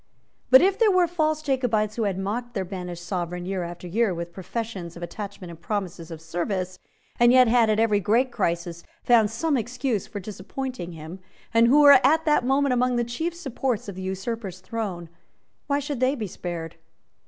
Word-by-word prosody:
But 260 +1 +8
if 390 +2 +2
there 450 -2 +5
were 370 -2 +4
false 310 -2 0
Jacobites 235 -7 0
who 225 - -1
had 195 -2 -1
mocked 235 +5 -4
their 190 -2 -1
banished 180 -2 -7
Sovereign 175 -1 -3
year 190 0 -2
after 175 +1 -7
year 205 +1 +1
with 170 0 -6
professions 190 -2 -5
of 170 - -8
attachment 190 0 -7
and 165 0 -13
promises 185 -3 -4
of 160 -2 -8
service, 180 +3 -3 0.4
and 240 0 +6
yet 255 -1 +6
had, 230 -1 +4
at 215 0 +2
every 220 -2 +3
great 235 +7 +2
crisis, 170 -5 -2 0.2
found 225 -3 +4
some 290 +7 0
excuse 245 -2 -2
for 215 -2 -6
disappointing 210 0 -6
him, 160 +3 -9 0.3
and 230 0 +5
who 285 +5 +6
were 285 -2 +9
at 315 +5 +4
that 300 -4 +3
moment 270 +1 +2
among 250 0 +1
the 240 - +1
chief 320 +9 -3
supports 260 - -3
of 200 - -5
the 190 - -8
usurper's 190 0 -4
throne, 185 -4 -5 0.6
why 280 -1 +1
should 285 -2 -3
they 260 +2 +2
be 225 -6 -4
spared? 170 -3 -6
215 Hz, 190 wpm, -25 LUFS, 180-255 Hz, 0.6 s, were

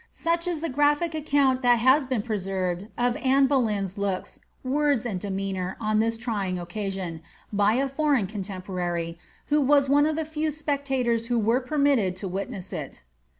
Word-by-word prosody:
Such 335 +1 -1
is 340 -3 -2
the 330 - -1
graphic 295 +4 +2
account 285 -4 +2
that 245 -1 +5
has 260 +4 +4
been 250 -5 -1
preserved 190 -3 -2
of 245 0 +1
Anne 270 +1 +3
Boleyn^s 210 -8 0
looks, 195 -2 -3 0.2
words, 280 -2 +1
and 205 -6 -2
demeanour 190 -1 -3
on 215 -1 +1
this 225 +1 +1
tr}'ing 205 -6 -2
occasion, 180 -2 -4 0.3
by 205 +1 +3
a 270 +3 +1
foreign 275 -5 +1
coo 205 +1 -5
temporary,^ 180 -3 -4 0.3
who 300 +1 +3
was 280 0 +4
one 290 +2 +5
of 310 - 0
the 320 0 -2
few 310 0 -2
specuitors 270 -6 -1
who 240 0 +1
were 230 +3 +2
permitted 270 -9 +2
to 190 +1 -5
witness 190 0 -5
it. 145 - -6
235 Hz, 170 wpm, -26 LUFS, 195-280 Hz, 0.3 s, that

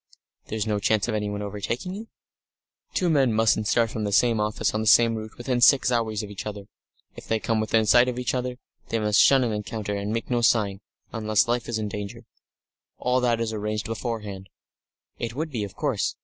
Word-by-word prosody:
"There's 110 -1 -2
no 105 -2 0
chance 110 +1 +1
of 115 - -2
anyone 105 -1 -2
overtaking 105 - -4
you?" 215 +3 -7 0.9
"Two 180 - +1
men 140 -7 +3
mustn't 110 -1 +2
start 115 0 +2
from 110 - -4
the 105 - -2
same 115 +2 +3
office 105 0 0
on 110 - -1
the 110 - -2
same 115 +1 +6
route 110 -1 -7
within 120 0 -1
six 130 0 +5
hours 110 -3 0
of 105 - -8
each 105 - -6
other. 105 -1 -6 0.5
If - - -11
they 110 - +1
come 115 0 0
within 110 0 +2
sight 120 +3 +5
of 125 -1 -2
each 125 - -1
other, 125 -1 -2 0.3
they 115 - 0
must 105 -2 +2
shun 135 -2 +5
an 115 -3 -1
encounter, 105 0 -4
and 100 +1 -3
make 115 +2 -3
no 120 -1 +2
sign 105 -4 +2 0.3
unless 110 +1 +1
life 120 0 -1
is 115 - -1
in 110 -1 -2
danger. 100 -1 -7 0.7
All 125 +1 +1
that 120 -2 +1
is 115 -1 -2
arranged 105 0 -3
beforehand." 110 -4 -5 0.7
"It 115 0 -4
would 155 +2 -3
be, 115 -5 -2
of 100 - -7
course. 135 -9 -1
110 Hz, 210 wpm, -25 LUFS, 105-120 Hz, 0.9 s, same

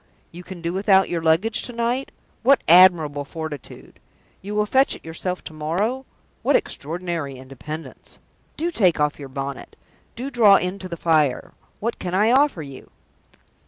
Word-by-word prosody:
You 175 - -10
can 180 -1 -10
do 170 +1 -2
without 195 0 +3
your 170 -1 -2
luggage 165 +9 +2
to 245 - -8
night? 235 +3 -1 0.3
What 270 +3 +4
admirable 165 -5 +6
fortitude! 155 -1 -9 0.4
You 205 +2 -6
will 210 0 +2
fetch 265 +5 +2
it - - -15
yourself 180 +3 -4
to - - -9
morrow? 195 +13 -2 0.3
What - - +2
extraordinary 165 -2 -3
independence! 135 +5 -9 0.4
Do 340 +2 -1
take 185 - +2
off 150 0 0
your 140 -2 -8
bonnet. 135 0 -6 0.4
Do 260 +4 -5
draw 220 -6 +6
in 185 +1 0
to 185 -1 -8
the 170 - -6
fire! 155 -5 +1 0.3
What 230 +3 -3
can 180 0 -3
I 210 +4 +3
offer 270 - +2
you?" 140 -2 -11
175 Hz, 160 wpm, -22 LUFS, 155-215 Hz, 0.4 s, admirable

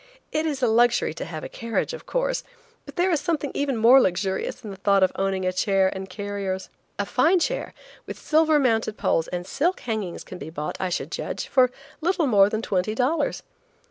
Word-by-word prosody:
It 310 +1 0
is 280 -4 -3
a - - +5
luxury 235 -4 +3
to 165 - -6
have 160 -2 -7
a - - -4
carriage, 230 - -3
of 485 - -9
course, - - -1 0.4
but - - -10
there 365 +1 +2
is 320 - +2
something 295 -3 -1
even 280 -3 -1
more 240 +4 +7
luxurious 190 0 -1
in 210 - -6
the - - -7
thought 195 0 +3
of 185 - +3
owning 195 -1 -1
a 185 - 0
chair 190 0 +2
and 190 0 -7
carriers. 195 -1 -4 0.3
A 205 - -1
fine 320 - +3
chair - - -2 0.3
with - - -6
silver 315 0 +3
mounted 225 -5 +1
poles 165 - +1
and 180 0 -4
silk 345 - 0
hangings 215 -7 -4
can 180 - -10
be 145 - -7
bought, 150 -1 -4
I 185 - -1
should 175 - -3
judge, - - -4
for 260 -2 +5
a - - -4 0.3
little 345 0 +1
more 200 -6 +5
than 220 +1 -3
twenty 195 +3 -1
dollars. 265 +7 0
220 Hz, 210 wpm, -24 LUFS, 190-285 Hz, 0.4 s, more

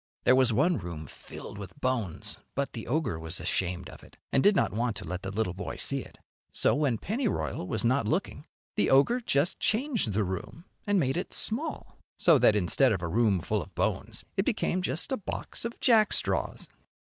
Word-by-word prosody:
There 130 - +5
was 130 -2 +4
one 150 +7 +2
room 85 -4 -7
filled 100 - -10
with 100 +7 -10
bones, 120 - -1 0.2
but 140 0 -2
the 115 - -7
ogre 125 - -1
was 80 0 -4
ashamed 90 -1 -2
of - - -13
it, - - -17
and 135 - +3
did 205 +5 +5
not - - +1
want 115 +1 -1
to - - -7
let 90 +3 -5
the 95 - -5
little 100 -2 -1
boy 95 - -6
see 140 - +1
it. - - -11 0.3
So - - +2
when 145 -6 +1
Pennyroyal 215 - -2
was 110 +3 -2
not 130 +4 +2
looking 160 -3 -2 0.3
the - - +2
ogre 140 - +4
just 150 - +1
changed 225 - +1
the 105 +2 +1
room 95 - -6 0.2
and 205 -1 +3
made 135 -2 0
it 180 - -2
small, 270 +9 +1 0.2
so 165 -5 +5
that 110 -3 +5
instead 105 +7 +3
of 95 -4 -1
a - - -1
room 100 0 +2
full - - -1
of - - -12
bones - - -2
it - - +1
became 185 - 0
just 165 - -2
a 265 - +1
box 210 - -5
of 235 - -5
jackstraws. 220 -3 +2
130 Hz, 200 wpm, -28 LUFS, -, 0.3 s, There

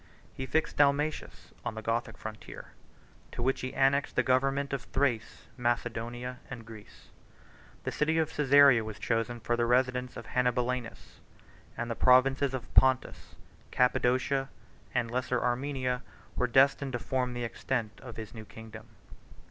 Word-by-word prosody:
He 130 - -5
fixed 160 +5 0
Dalmatius 145 +2 0
on - - -4
the 110 - -6
Gothic 115 +1 -2
frontier, 110 0 -9 0.6
to 120 - -4
which 135 +2 0
he 130 - -5
annexed 140 +1 +2
the 130 - +3
government 135 +2 +1
of 135 - -3
Thrace, 125 -5 -1
Macedonia, 120 +1 -2
and 115 -4 -8
Greece. 110 -2 -13 0.7
The - - -2
city 160 +2 +1
of 160 -1 +1
Cæsarea 140 -4 +6
was 110 -1 -7
chosen 115 +1 -1
for 120 +1 0
the 120 0 +1
residence 125 +1 +1
of 115 - -8
Hannibalianus; 125 -1 -2 0.6
and 120 0 -3
the - - -2
provinces 130 +2 +4
of 125 -2 -8
Pontus, 130 -1 +2 0.4
Cappadocia, 130 +2 +1 0.4
and 120 -2 -1
the - - -9
Lesser 125 0 0
Armenia, 125 0 -1 0.3
were 125 - +1
destined 135 +2 +3
to - - 0
form 125 0 -2
the 120 - -3
extent 115 -2 -3
of 120 -3 -10
his 110 -2 -7
new 110 -2 -9
kingdom. 110 0 -11
125 Hz, 150 wpm, -30 LUFS, 115-135 Hz, 0.7 s, Cæsarea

